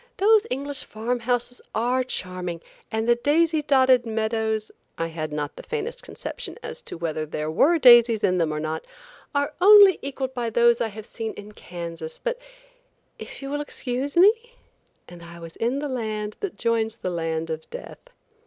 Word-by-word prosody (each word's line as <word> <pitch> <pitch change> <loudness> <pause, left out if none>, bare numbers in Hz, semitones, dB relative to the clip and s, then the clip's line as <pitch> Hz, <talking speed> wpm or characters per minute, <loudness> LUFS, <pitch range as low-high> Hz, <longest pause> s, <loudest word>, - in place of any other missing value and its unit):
"Those 435 +2 +4
English 280 +2 -3
farm 235 +3 -3
houses 245 +1 -2
are 250 +3 +1
charming 180 -7 -4 0.3
and 220 0 -1
the 240 - +6
daisy 310 +6 +2
dotted 260 -3 +4
meadows 220 -1 -1 0.3
(I 165 - -1
had 155 -2 -5
not 150 -1 -4
the - - -9
faintest 465 +1 -4
conception - - -7
as - - -6
to - - -6
whether 160 -2 -2
there 155 0 -4
were 310 - +4
daisies 240 -5 +7
in 180 -1 +2
them 165 -2 +1
or 150 - -2
not), 155 +1 -3 0.5
are 285 +1 0
only 400 -1 +8
equaled 270 -1 -4
by 240 -2 -2
those 235 +1 +3
I 230 - +1
have 215 0 -9
seen 225 -1 -5
in 205 +1 -10
Kansas, 170 -4 -7
but - - -3 0.8
if - - -9
you 275 - -5
will 290 0 -1
excuse 275 +1 -4
me?–" 455 +6 +4 0.5
and 175 -1 -12
I 170 0 -11
was 165 -1 -10
in 240 +4 0
the 295 +1 -3
land 215 -5 -3
that 400 -3 -5
joins 225 -1 0
the 185 -5 -4
land 165 -1 -2
of 160 0 -6
death. - - -9
235 Hz, 180 wpm, -24 LUFS, 180-280 Hz, 0.8 s, only